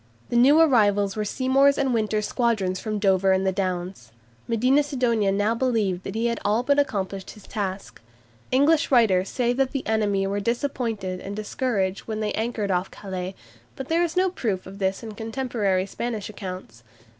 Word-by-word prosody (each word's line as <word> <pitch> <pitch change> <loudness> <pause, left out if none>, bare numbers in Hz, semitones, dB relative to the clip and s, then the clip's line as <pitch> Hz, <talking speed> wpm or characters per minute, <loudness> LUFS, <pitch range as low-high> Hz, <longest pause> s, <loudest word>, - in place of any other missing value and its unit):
The - - -2
new 270 +6 +6
arrivals 205 -10 +3
were 215 - -1
Seymour's 270 +5 +3
and 265 -2 +1
Winter's 215 -2 0
squadrons 210 -7 0
from 215 -1 -3
Dover 195 -1 +3
and 190 0 +1
the 190 - +2
Downs. 180 - -3 0.4
Medina 250 +5 +3
Sidonia 245 -8 +1
now 205 +3 +1
believed 225 -7 0
that - - -5
he 225 +1 0
had 235 -1 0
all 215 +4 +1
but 285 +2 +3
accomplished 195 -8 -2
his 210 - -12
task. 195 - -5 0.5
English 290 +4 +3
writers 200 -7 +3
say 245 -1 0
that 265 +1 0
the 275 - -3
enemy 205 -3 +1
were 200 +1 -1
disappointed 230 -5 -2
and 200 +2 -6
discouraged 210 -3 -2
when 215 -1 -3
they 215 -1 -1
anchored 220 -3 -2
off 180 +1 0
Calais, 185 -1 -6 0.4
but 265 - -7
there 330 +1 +2
is 345 0 -1
no 370 0 +3
proof 210 - -2
of 195 +2 -10
this 190 +2 -1
in 220 - -6
contemporary 220 -4 -1
Spanish 220 0 -4
accounts. 185 - -8
215 Hz, 180 wpm, -24 LUFS, 195-245 Hz, 0.5 s, new